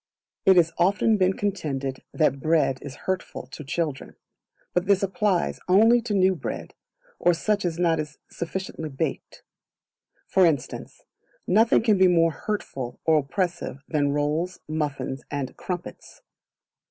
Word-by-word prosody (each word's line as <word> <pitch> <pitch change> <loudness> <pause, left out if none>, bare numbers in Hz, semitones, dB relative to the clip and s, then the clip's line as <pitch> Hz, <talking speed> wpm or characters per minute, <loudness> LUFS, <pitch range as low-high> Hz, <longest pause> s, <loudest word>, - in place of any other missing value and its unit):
It 190 - +8
has 165 -2 +4
often 200 +5 +3
been 185 -1 +3
contended 140 -10 -3
that 150 -3 +1
Bread 155 -3 +2
is 140 -2 -8
hurtful 185 -7 -3
to 135 +4 -9
children; 150 -1 -3 0.6
but 180 +1 0
this 200 -1 +3
applies 195 -2 0
only 225 +6 +5
to 225 -3 -2
new 190 0 +4
bread, 175 - -6 0.5
or 175 - +3
such 205 +4 0
as 175 - 0
is 165 - -10
not 165 -2 +2 0.3
sufficiently 170 -2 -5
baked; 135 - -4 0.8
for 190 - +3
instance, 155 -7 -1 0.4
nothing 220 +4 +4
can 215 -4 +3
be 190 - +7
more 165 -2 +4
hurtful 135 - -5
or 160 -1 +5
oppressive 150 -1 -3
than 145 -3 +1
rolls, 150 +5 -1
muffins, 145 -3 -3
and 140 -3 -4
crumpets. 180 - -7
170 Hz, 140 wpm, -25 LUFS, 145-190 Hz, 0.8 s, It